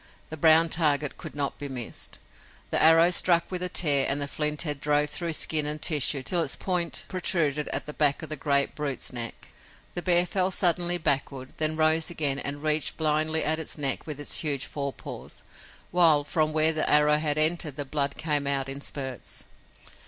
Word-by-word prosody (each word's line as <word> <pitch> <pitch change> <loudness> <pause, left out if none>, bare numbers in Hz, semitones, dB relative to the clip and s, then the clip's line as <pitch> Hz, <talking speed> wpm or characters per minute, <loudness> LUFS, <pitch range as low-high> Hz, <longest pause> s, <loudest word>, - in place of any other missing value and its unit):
The - - -4
brown 160 +1 +4
target 150 -3 0
could - - -9
not 140 -1 -3
be 145 0 -6
missed. 125 -4 -6 0.5
The - - +3
arrow 165 +2 +6
struck 170 -1 +3
with 180 -1 -2
a 180 - -1
tear 145 -6 +3
and 140 - 0
the 140 - -3
flint 150 +1 -1
head 145 -4 -2
drove 150 0 0
through 170 -2 -1
skin 155 -1 +2
and 150 +1 -4
tissue 145 -4 +1
till 175 +5 0
its 140 - 0
point 170 -7 -1
protruded 155 -5 0
at - - -2
the 150 - -7
back 145 0 +1
of 160 - -6
the 155 - -3
great 140 -1 0
brute's 140 -4 -2
neck. 115 -1 -7 0.4
The 175 - -3
bear 175 0 +3
fell 185 +1 0
suddenly 175 -1 +2
backward, 135 -4 -1
then 155 0 +1
rose 160 0 +2
again 145 -5 -1
and 145 +1 -6
reached 155 -1 0
blindly 155 0 +1
at 160 +1 -1
its 160 - -3
neck 140 0 0
with 150 -2 -6
its 145 - +1
huge 140 -3 -1
fore 140 -1 -5
paws, - - -10 0.5
while 165 -5 +4
from 155 +1 -1
where 155 +1 +3
the 155 - -1
arrow 150 0 +4
had 150 -1 -1
entered 155 -2 +1
the 145 - -4
blood 140 0 -2
came 150 -3 0
out 135 -1 -1
in 135 +1 -6
spurts. 130 -3 -5
150 Hz, 195 wpm, -26 LUFS, 140-160 Hz, 0.5 s, arrow